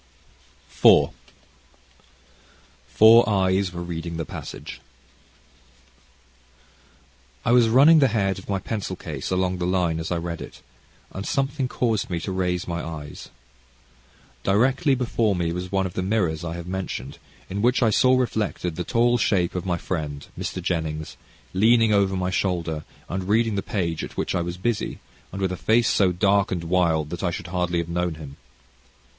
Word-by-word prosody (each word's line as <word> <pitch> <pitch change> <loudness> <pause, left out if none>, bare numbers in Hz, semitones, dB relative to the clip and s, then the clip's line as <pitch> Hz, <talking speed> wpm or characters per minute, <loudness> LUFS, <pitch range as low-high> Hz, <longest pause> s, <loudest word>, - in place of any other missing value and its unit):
CHAPTER - - +7
IV - - +7 1.8
Four 110 - +6
Eyes 95 -1 +1
Were 85 0 -6
Reading 85 -1 -5
the 80 - -3
Passage - - -8 2.6
I - - +2
was 120 -2 +5
running 145 +7 +7
the 135 - +5
head 100 -4 0
of 95 - -14
my 100 - +1
pencil 95 -1 -4
case 80 -7 -6
along 95 0 0
the 90 - -1
line 90 -3 +1
as 80 - -4
I 90 - +1
read 85 0 -5
it, - - -10 0.5
and 95 - -6
something 135 +3 -1
caused 115 -5 -1
me 85 -2 -2
to 95 - -4
raise 90 -1 -1
my 85 0 -3
eyes. 75 -3 -8 1.1
Directly 130 - +2
before 115 -4 0
me 85 -1 -1
was 90 +1 -5
one 95 -1 +1
of 90 - -5
the - - -2
mirrors 90 -6 0
I 85 0 -4
have 85 -1 -7
mentioned, 90 -8 -5 0.3
in 100 +2 -4
which 125 +3 +3
I 110 - +3
saw 130 +4 +4
reflected 105 -8 -2
the 90 - -2
tall 120 +6 +2
shape 90 -5 +1
of 90 +1 -4
my 90 -1 0
friend, 75 -5 -4
Mr. - - -5
Jennings, 80 -2 -3 0.4
leaning 110 +3 +4
over 100 -1 +2
my 90 0 -1
shoulder, 85 -5 -1 0.2
and 95 +1 -4
reading 115 +1 +2
the 100 - -1
page 85 -7 -2
at - - -8
which - - -1
I 90 - 0
was 85 +1 -4
busy, 110 +4 -2 0.3
and 95 - -6
with 95 -1 0
a 90 - -4
face 115 +5 +2
so 95 -3 +3
dark 100 +2 +2
and 90 -3 -2
wild 80 -3 +1
that 85 - -5
I 95 - 0
should 85 - -5
hardly 90 -1 -1
have 85 -1 -1
known 85 -1 -1
him. 70 -3 -10
95 Hz, 175 wpm, -24 LUFS, 85-110 Hz, 2.6 s, CHAPTER